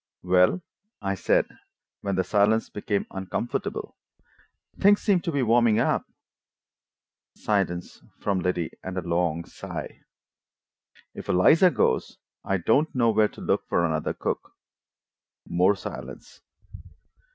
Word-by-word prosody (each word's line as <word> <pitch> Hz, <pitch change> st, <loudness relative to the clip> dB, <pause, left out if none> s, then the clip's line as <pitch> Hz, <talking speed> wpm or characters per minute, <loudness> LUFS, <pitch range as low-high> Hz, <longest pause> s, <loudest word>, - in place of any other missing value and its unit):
"Well," 90 Hz, -, +3 dB, 0.4 s
I 100 Hz, -1 st, -2 dB
said, 95 Hz, -, +2 dB, 0.6 s
when 100 Hz, -1 st, -2 dB
the 95 Hz, -, +1 dB
silence 105 Hz, +3 st, +2 dB
became 105 Hz, -1 st, -2 dB
uncomfortable, 95 Hz, +5 st, -4 dB, 0.8 s
"things 205 Hz, +1 st, +5 dB
seem 200 Hz, -4 st, +3 dB
to 170 Hz, -, -2 dB
be 140 Hz, -3 st, 0 dB
warming 115 Hz, -1 st, +4 dB
up." -, -, +1 dB, 1.3 s
Silence 95 Hz, -4 st, -2 dB, 0.2 s
from 100 Hz, -2 st, -1 dB
Liddy, 90 Hz, -2 st, -1 dB
and 95 Hz, 0 st, -6 dB
a -, -, 0 dB
long 85 Hz, -1 st, 0 dB
sigh. -, -, -8 dB, 1.1 s
"If -, -, -9 dB
Eliza 155 Hz, -, +6 dB
goes, 115 Hz, -, 0 dB, 0.3 s
I 95 Hz, -, 0 dB
don't 135 Hz, -, +1 dB
know 115 Hz, -2 st, +3 dB
where 110 Hz, 0 st, +4 dB
to -, -, -13 dB
look -, -, 0 dB
for 85 Hz, -, +2 dB
another 80 Hz, -2 st, -1 dB
cook." -, -, -4 dB, 0.9 s
More 90 Hz, +4 st, +3 dB
silence. -, -, -9 dB
100 Hz, 120 wpm, -26 LUFS, 90-115 Hz, 1.3 s, Eliza